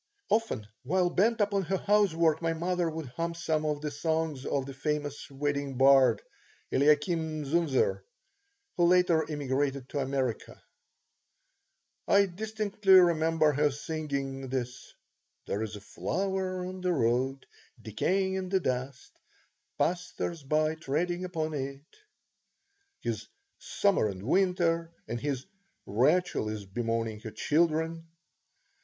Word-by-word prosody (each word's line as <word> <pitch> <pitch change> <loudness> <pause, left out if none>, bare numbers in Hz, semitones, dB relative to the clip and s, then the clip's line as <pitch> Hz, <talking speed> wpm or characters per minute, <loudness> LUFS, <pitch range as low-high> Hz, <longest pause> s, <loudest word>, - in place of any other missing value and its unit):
Often, 215 - 0
while 175 +6 +1
bent 220 +5 +2
upon 200 -1 +2
her 190 +4 0
housework, 170 -6 +2
my 165 -1 +1
mother 175 +1 0
would 160 -4 -6
hum 170 +6 -3
some 160 -2 -1
of 150 -1 -1
the 150 -1 -3
songs 160 -2 -2
of 135 -2 0
the 135 - -7
famous 145 +1 -3
wedding 140 -1 -2
bard, 130 -4 +5 0.5
Eliakim 155 +2 +2
Zunzer, 135 - +1 0.8
who 175 - +4
later 175 -3 +3
emigrated 140 -2 -1
to 145 - -2
America. 135 -3 -2 1.5
I 200 0 +5
distinctly 205 +1 0
remember 165 -3 +5
her 145 +1 +2
singing 140 -3 -4
his 125 -1 -4 0.5
"There 100 - -2
is 110 -1 -4
a 105 - -9
flower 185 - -2
on 185 0 -6
the 180 -1 +1
road, 130 0 0 0.3
decaying 185 - 0
in 190 -1 -3
the 190 0 +2
dust, 130 -3 -3 0.7
Passers 175 -1 -2
by 155 +3 +1
treading 170 +4 -2
upon 160 -3 -3
it," 140 0 -5 1.2
his - - -3 0.3
"Summer 200 - +1
and 95 -2 -6
Winter," 170 - +1 0.2
and 120 - -3
his 135 -2 -2 0.4
"Rachael 130 - +2
is 105 -2 -5
bemoaning 115 +1 -2
her 110 - -7
children." 160 +7 0
155 Hz, 125 wpm, -29 LUFS, 135-175 Hz, 1.5 s, bard